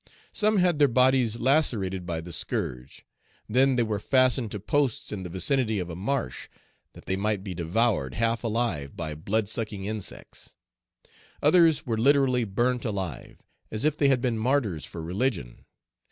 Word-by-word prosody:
Some 215 Hz, 0 st, +2 dB
had 180 Hz, -4 st, +2 dB
their 145 Hz, -, +6 dB
bodies 125 Hz, -2 st, +3 dB
lacerated 110 Hz, -, +1 dB
by 85 Hz, -2 st, -2 dB
the 85 Hz, +1 st, -8 dB
scourge; 60 Hz, -2 st, -4 dB, 0.4 s
then 130 Hz, +4 st, +3 dB
they 120 Hz, -, +2 dB
were 110 Hz, -2 st, -2 dB
fastened 130 Hz, 0 st, +2 dB
to 105 Hz, -, -5 dB
posts 135 Hz, +4 st, -1 dB
in 105 Hz, -, -4 dB
the 90 Hz, -, -6 dB
vicinity 110 Hz, +5 st, 0 dB
of 90 Hz, -2 st, -4 dB
a -, -, -6 dB
marsh, 95 Hz, -, -3 dB, 0.5 s
that -, -, -14 dB
they 95 Hz, -, 0 dB
might 100 Hz, 0 st, -1 dB
be 95 Hz, -3 st, -5 dB
devoured, 85 Hz, -, 0 dB
half 115 Hz, +1 st, 0 dB
alive, 110 Hz, -, -2 dB
by 80 Hz, -2 st, -3 dB
blood 100 Hz, +8 st, -1 dB
sucking 105 Hz, -3 st, -4 dB
insects. 105 Hz, -2 st, -7 dB, 0.9 s
Others 160 Hz, 0 st, +4 dB
were 115 Hz, -4 st, -1 dB
literally 130 Hz, -1 st, +3 dB
burnt 120 Hz, +5 st, 0 dB
alive, 95 Hz, -, -5 dB, 0.3 s
as 110 Hz, +5 st, -2 dB
if 155 Hz, -1 st, +2 dB
they 145 Hz, -, +2 dB
had 135 Hz, -3 st, +3 dB
been 120 Hz, -3 st, 0 dB
martyrs 110 Hz, -, 0 dB
for 80 Hz, -, -8 dB
religion. 90 Hz, -, -2 dB
110 Hz, 165 wpm, -26 LUFS, 95-130 Hz, 0.9 s, their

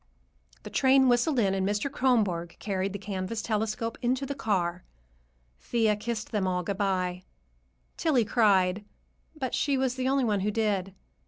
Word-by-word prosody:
The -, -, -9 dB
train 265 Hz, 0 st, +4 dB
whistled 245 Hz, +4 st, +2 dB
in, 200 Hz, -5 st, +2 dB
and 190 Hz, -1 st, 0 dB
Mr. 205 Hz, +6 st, 0 dB
Kronborg 205 Hz, -11 st, +1 dB
carried 195 Hz, -1 st, -2 dB
the 200 Hz, -, -4 dB
canvas 200 Hz, +2 st, -4 dB
"telescope" 220 Hz, +1 st, -2 dB
into 255 Hz, +2 st, 0 dB
the 280 Hz, -, -3 dB
car. 185 Hz, -9 st, -1 dB, 0.8 s
Thea 220 Hz, -, +1 dB
kissed 215 Hz, +1 st, -4 dB
them 205 Hz, -3 st, 0 dB
all 180 Hz, -1 st, -1 dB
good 195 Hz, +3 st, -4 dB
bye. 185 Hz, -2 st, 0 dB, 0.8 s
Tillie 275 Hz, -9 st, +2 dB
cried, 200 Hz, -3 st, +3 dB, 0.5 s
but 265 Hz, -5 st, -4 dB
she 280 Hz, -2 st, +1 dB
was 260 Hz, -1 st, +1 dB
the 260 Hz, 0 st, -1 dB
only 275 Hz, 0 st, +2 dB
one 210 Hz, -4 st, +1 dB
who 200 Hz, +2 st, 0 dB
did. 200 Hz, -3 st, -1 dB
210 Hz, 160 wpm, -28 LUFS, 190-245 Hz, 0.8 s, train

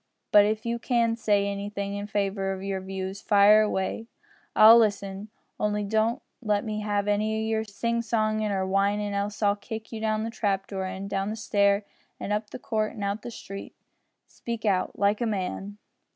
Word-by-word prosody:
But 205 Hz, -1 st, +7 dB
if 215 Hz, +1 st, -1 dB
you 235 Hz, 0 st, -1 dB
can 235 Hz, -2 st, +1 dB
say 210 Hz, -3 st, +2 dB
anything 200 Hz, 0 st, -3 dB
in 205 Hz, 0 st, -4 dB
favour 195 Hz, -2 st, -1 dB
o' 190 Hz, -, -6 dB
your 195 Hz, 0 st, -3 dB
views, 190 Hz, +1 st, -5 dB
fire 210 Hz, +1 st, +6 dB
away; 215 Hz, +2 st, -1 dB, 0.5 s
I'll 225 Hz, +2 st, +9 dB
listen, 200 Hz, -1 st, -1 dB, 0.3 s
only 210 Hz, 0 st, 0 dB
don't 220 Hz, +6 st, 0 dB, 0.2 s
let 210 Hz, -3 st, 0 dB
me 215 Hz, -1 st, -3 dB
have 205 Hz, -1 st, -1 dB
any 215 Hz, +1 st, +1 dB
o' 220 Hz, 0 st, -2 dB
your 220 Hz, 0 st, 0 dB
sing 235 Hz, +2 st, -2 dB
songin' 215 Hz, -2 st, 0 dB
or 190 Hz, -1 st, 0 dB
whinin', 200 Hz, +2 st, +1 dB
else 200 Hz, +2 st, -2 dB
I'll 205 Hz, 0 st, +4 dB
kick 220 Hz, +1 st, -8 dB
you 225 Hz, -2 st, -6 dB
down 215 Hz, 0 st, 0 dB
the 225 Hz, -, -3 dB
trap 200 Hz, -3 st, -1 dB
door 190 Hz, -1 st, -4 dB
and 190 Hz, +1 st, -5 dB
down 195 Hz, 0 st, -2 dB
the 215 Hz, -, -3 dB
stair 200 Hz, -2 st, +2 dB, 0.3 s
an' -, -, -4 dB
up 210 Hz, 0 st, -1 dB
the -, -, -7 dB
court 215 Hz, -3 st, -2 dB
and 210 Hz, -, -6 dB
out 200 Hz, +1 st, -1 dB
into 225 Hz, -, -10 dB
the -, -, -6 dB
street 195 Hz, -3 st, -9 dB, 0.5 s
speak 230 Hz, -2 st, -6 dB
out, 190 Hz, -3 st, 0 dB
like 205 Hz, +3 st, +2 dB
a 235 Hz, -, +1 dB
man." 200 Hz, 0 st, -3 dB
210 Hz, 195 wpm, -26 LUFS, 200-220 Hz, 0.5 s, I'll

